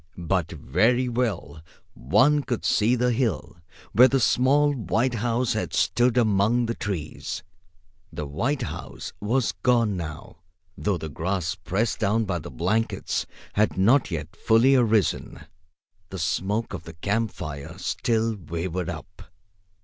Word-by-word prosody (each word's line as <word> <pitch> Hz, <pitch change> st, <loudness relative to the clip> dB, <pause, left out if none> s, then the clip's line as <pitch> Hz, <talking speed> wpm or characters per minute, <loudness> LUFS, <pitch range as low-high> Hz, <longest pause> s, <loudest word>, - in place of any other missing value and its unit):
But 85 Hz, -1 st, -1 dB
very 110 Hz, -, +1 dB
well 110 Hz, -11 st, -2 dB, 0.3 s
one 135 Hz, -, +3 dB
could 125 Hz, -4 st, -3 dB
see 115 Hz, +4 st, +3 dB
the 125 Hz, 0 st, +1 dB
hill 110 Hz, -, -1 dB, 0.3 s
where 125 Hz, +3 st, +7 dB
the 135 Hz, 0 st, +1 dB
small 140 Hz, +5 st, +3 dB
white 120 Hz, +1 st, 0 dB
house 120 Hz, +1 st, 0 dB
had -, -, -3 dB
stood 120 Hz, 0 st, +2 dB
among 110 Hz, +1 st, +3 dB
the 115 Hz, -, -1 dB
trees. 95 Hz, -9 st, -5 dB, 0.7 s
The 75 Hz, -, -5 dB
white 120 Hz, -, -1 dB
house -, -, -7 dB
was 115 Hz, +4 st, +1 dB
gone 115 Hz, -5 st, +3 dB
now, 80 Hz, -2 st, -7 dB, 0.4 s
though 100 Hz, -3 st, -1 dB
the 80 Hz, -, -6 dB
grass 85 Hz, +2 st, -2 dB
pressed 105 Hz, +5 st, -2 dB
down 110 Hz, +3 st, +1 dB
by 90 Hz, -3 st, -2 dB
the 75 Hz, -, -8 dB
blankets 110 Hz, -, -1 dB, 0.3 s
had 105 Hz, -1 st, +1 dB
not 115 Hz, +8 st, +4 dB
yet 80 Hz, -3 st, -5 dB
fully 115 Hz, +4 st, +4 dB
arisen. 115 Hz, -6 st, +1 dB, 0.7 s
The 95 Hz, -, -6 dB
smoke 100 Hz, +7 st, -1 dB
of 80 Hz, -, -6 dB
the 80 Hz, -, -9 dB
camp 100 Hz, +7 st, -1 dB
fire 75 Hz, -6 st, -7 dB
still 115 Hz, -1 st, 0 dB
wavered 85 Hz, 0 st, -4 dB
up. 90 Hz, +4 st, -9 dB
105 Hz, 140 wpm, -25 LUFS, 85-120 Hz, 0.7 s, where